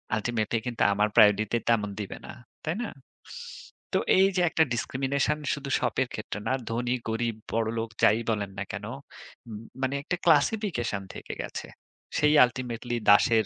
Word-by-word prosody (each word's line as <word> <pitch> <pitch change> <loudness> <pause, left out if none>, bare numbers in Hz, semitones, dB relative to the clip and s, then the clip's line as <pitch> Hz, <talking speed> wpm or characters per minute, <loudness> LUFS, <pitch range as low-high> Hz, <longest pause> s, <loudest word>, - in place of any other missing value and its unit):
Ultimately 110 0 -1
কিন্তু 120 -2 0
আমার 105 +1 +2
priority 110 0 +5
তেমন 105 -3 +2
দিবে 100 - -6
না। - - -8 0.3
তাই 160 +2 -1
না? - - -3 1.1
তো - - +4 0.2
এইযে 190 -1 +4
একটা 160 - +3
ডিসক্রিমিনেশন 135 +5 0
শুধু 140 -1 -5
শপের 130 +1 0
ক্ষেত্রে 105 -1 -5
না, - - +2 0.2
ধনী, 120 +2 -1 0.2
গরিব, 115 0 -1 0.2
বড়লোক 115 0 -1
যাই 110 - +6
বলেন 105 -3 -1
না - - -1
কেন, 100 +2 -5 0.6
উম 105 -2 -6 0.2
মানে 135 +1 0
একটা 180 - -1
ক্লাসিফিকেশন 150 - +2
থেকে - - -7
গেছে। - - -6 0.5
সেই 150 0 +4
আল্টিমেটলি 120 -1 -4
দাসের 110 +2 +6
120 Hz, 145 wpm, -27 LUFS, 110-140 Hz, 1.1 s, যাই